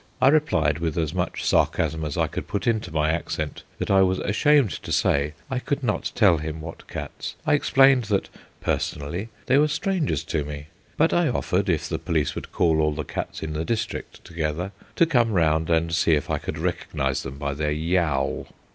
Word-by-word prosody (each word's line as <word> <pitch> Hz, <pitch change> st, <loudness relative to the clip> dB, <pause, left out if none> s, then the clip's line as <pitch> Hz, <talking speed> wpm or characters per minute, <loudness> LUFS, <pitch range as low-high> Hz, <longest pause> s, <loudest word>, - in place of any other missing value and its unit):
I 130 Hz, -, +6 dB
replied 85 Hz, -, +2 dB
with 80 Hz, -2 st, -2 dB
as 80 Hz, -1 st, 0 dB
much 90 Hz, -1 st, -2 dB
sarcasm 80 Hz, -1 st, +1 dB
as 75 Hz, -2 st, -3 dB
I -, -, +3 dB
could -, -, -5 dB
put 100 Hz, -, -3 dB
into 110 Hz, -7 st, 0 dB
my 80 Hz, -1 st, +1 dB
accent 80 Hz, -2 st, -3 dB, 0.2 s
that -, -, -2 dB
I 95 Hz, 0 st, +6 dB
was 95 Hz, 0 st, +3 dB
ashamed 130 Hz, +3 st, +3 dB
to -, -, -7 dB
say 70 Hz, +1 st, +1 dB
I 130 Hz, -2 st, -2 dB
could 145 Hz, +2 st, -2 dB
not 110 Hz, -1 st, -1 dB
tell 95 Hz, -8 st, +5 dB
him 80 Hz, +1 st, -5 dB
what 80 Hz, +1 st, -9 dB
cats. -, -, -6 dB
I 155 Hz, -, +3 dB
explained 135 Hz, -3 st, +5 dB
that, 100 Hz, -2 st, 0 dB, 0.3 s
personally, 85 Hz, +10 st, -2 dB, 0.2 s
they 135 Hz, -, +4 dB
were 150 Hz, -, +4 dB
strangers 160 Hz, -, -1 dB
to 80 Hz, -2 st, -1 dB
me; 75 Hz, +1 st, -7 dB, 0.3 s
but 160 Hz, +2 st, +3 dB
I 175 Hz, -2 st, +3 dB
offered, 100 Hz, -6 st, 0 dB
if 85 Hz, -4 st, 0 dB
the -, -, -3 dB
police 80 Hz, -3 st, 0 dB
would -, -, -7 dB
call 80 Hz, -2 st, +2 dB
all 75 Hz, 0 st, +2 dB
the 75 Hz, -, -3 dB
cats -, -, -5 dB
in 80 Hz, 0 st, -3 dB
the 75 Hz, +1 st, -2 dB
district 110 Hz, +4 st, -4 dB
together, 85 Hz, +2 st, -3 dB, 0.2 s
to 170 Hz, -, +5 dB
come 120 Hz, -8 st, +2 dB
round 80 Hz, -2 st, +2 dB
and 85 Hz, 0 st, +1 dB
see 85 Hz, 0 st, +3 dB
if 75 Hz, -, -2 dB
I -, -, 0 dB
could -, -, -5 dB
recognise 65 Hz, -1 st, -1 dB
them 65 Hz, +1 st, -7 dB
by 70 Hz, -1 st, -2 dB
their 75 Hz, +1 st, -1 dB
yaul. 80 Hz, -3 st, 0 dB
85 Hz, 200 wpm, -24 LUFS, 75-115 Hz, 0.3 s, I